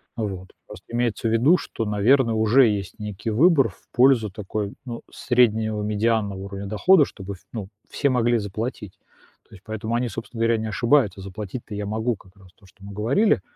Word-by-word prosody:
Вот. 95 -5 -4 0.2
Просто - - -12
имеется 120 -1 0
в 110 - 0
виду, 135 +11 +4
что, 115 - -5
наверно, 115 +4 +3
уже 115 +4 +5
есть 100 -1 -3
некий 105 +1 -4
выбор 140 0 +4
в 95 - -21
пользу 125 -4 +4
такой, 100 +1 -4
ну, 120 -2 -6
среднего 110 -4 +1
медианного 105 -1 0
уровня 100 +1 -6
дохода, 145 - +4
чтобы, 100 -1 -8
ф 95 - -13
ну, 105 -5 -5 0.2
все 140 - 0
могли 120 -2 +2
заплатить. 105 0 -5 0.6
То - - -14
есть 95 - -17
поэтому 110 +1 -3
они, 120 0 0
собственно 115 +1 -8
говоря, 115 0 +3
не 110 0 -3
ошибаются. 115 -3 +2
Заплатить-то 105 +4 -7
я 105 0 -3
могу, 110 +3 -1
как 95 -1 -21
раз, 95 -2 -18
то, 105 - -23
что 95 - -21
мы 100 0 -9
говорили. 135 - +2
110 Hz, 185 wpm, -23 LUFS, 100-120 Hz, 0.6 s, уже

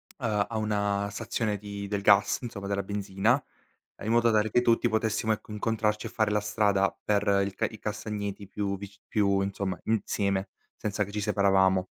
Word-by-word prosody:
ehm, 110 -6 -2
a 115 - -3
una 100 -1 0
stazione 105 0 -2
di 100 0 -6
del 100 0 -2
gas, 100 +1 +4
insomma, 115 -5 -6
della 100 0 0
benzina, 100 +5 +1 0.6
in 110 - -1
modo 120 0 +4
tale 110 0 +2
che 120 +3 +3
tutti 120 0 +3
potessimo, 110 0 0
ecco, 110 0 -3
incontrarci 105 0 -1
e - - -8
fare 110 -2 +1
la 105 - +2
strada 100 -2 +2
per 105 -1 +2 0.2
il 100 - -4 0.2
i 110 - -9
castagneti 105 -2 -4
più 100 0 -2
vic 100 0 -10
più 100 -2 +2
insomma 100 -1 -2
insieme, 100 -3 0 0.3
senza 105 0 -1
che 100 - -8
ci 105 0 -2
separavamo. 95 -2 +3
105 Hz, 175 wpm, -28 LUFS, 100-110 Hz, 0.6 s, gas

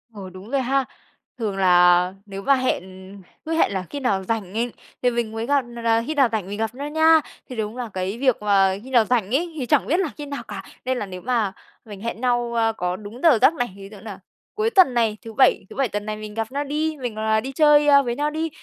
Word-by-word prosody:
Ừ, 195 -2 -8
đúng 185 +4 -11
rồi 275 -1 +1
ha. 265 +1 +1 0.5
Thường 210 -4 -2
là 180 -1 +5
nếu 195 -1 -7
mà 275 +7 +4
hẹn, 255 -8 0 0.6
cứ 320 - -2
hẹn 325 - +2
là 190 -2 -2
khi 285 - -5
nào 200 -7 0
rảnh, 200 -2 -3 0.5
thì 250 - +3
mình 235 -2 -2
mới 225 +1 -4
gặp 280 +2 +2
nà 235 0 -9
nà 230 0 +2
khi 310 - -1
nào 275 -4 +4
rảnh 210 -4 -2
mình 205 +1 -5
gặp 225 +2 -2
nhau 285 +2 -5
nha, 320 +1 +5 0.3
thì 250 - -7
đúng 220 +1 -4
là 245 -2 -4
cái 190 +3 -3
việc 255 -3 +1
mà 195 -2 +3
khi 260 - -11
nào 240 -4 +4
rảnh 235 -1 0
ấy, 335 +3 -1
thì 265 - -2
chẳng - - +2
biết 340 +6 +2
là 370 - 0
khi 295 - -6
nào 280 -4 -6
cả. 195 -2 -7 0.2
Nên 260 0 0
là 210 - -3
nếu 185 -1 -8
mà 225 -5 0 0.3
mình 205 -3 -10
hẹn 230 0 -5
nhau, 240 -1 0
ờ, 225 -1 +1
có 180 0 -1
đúng 210 +5 -10
giờ 315 -8 +6
giấc - - +6
này, 245 -6 -2
ví 195 0 -11
dụ 210 - -11
nà 205 -2 -9 0.4
cuối 430 +1 +1
tuần 375 - +5
này 225 -3 +1
thứ 225 - -8
Bảy 260 -4 +3
thứ - - -11
Bảy 270 -2 +1
tuần 205 0 -4
này 215 0 -4
mình 215 0 -8
gặp 225 +1 -3
nhau 285 +2 -2
đi, 305 +2 -2
mình, 245 -4 -4
à, 220 0 +2
đi 265 +5 -5
chơi 295 +1 +5 0.2
với 240 -2 -2
nhau 295 +2 0
đi, 320 +2 -2
235 Hz, 260 wpm, -22 LUFS, 205-275 Hz, 0.6 s, giờ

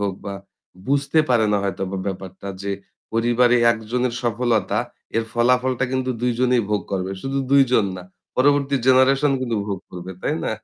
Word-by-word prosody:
হোক 100 -1 0
বা 100 -1 -4 0.5
বুঝতে 140 +3 +1
পারে 120 -3 +3
না - - +3
হয়তোবা 95 0 -3
ব্যাপারটা 95 0 -6
যে 100 - -2 0.4
পরিবারে 120 +1 +3 0.2
একজনের 115 +2 -2
সফলতা 115 -3 0 0.4
এর 115 - +1
ফলাফলটা 125 +1 +2
কিন্তু 130 0 0
২ 125 0 +2
জনেই 125 -2 +3
ভোগ 105 - +1
করবে। 95 0 -2
শুধু 135 +1 -2
২ 140 0 +7
জন 110 -5 +4
না। 90 - -8 0.3
পরবর্তী 140 +1 +3
জেনারেশন 135 +2 +4
কিন্তু 120 -3 -1
ভোগ 100 -3 -3
করবে, 90 +1 -8
তাই 150 - 0
না? - - -1
120 Hz, 165 wpm, -22 LUFS, 100-130 Hz, 0.5 s, ২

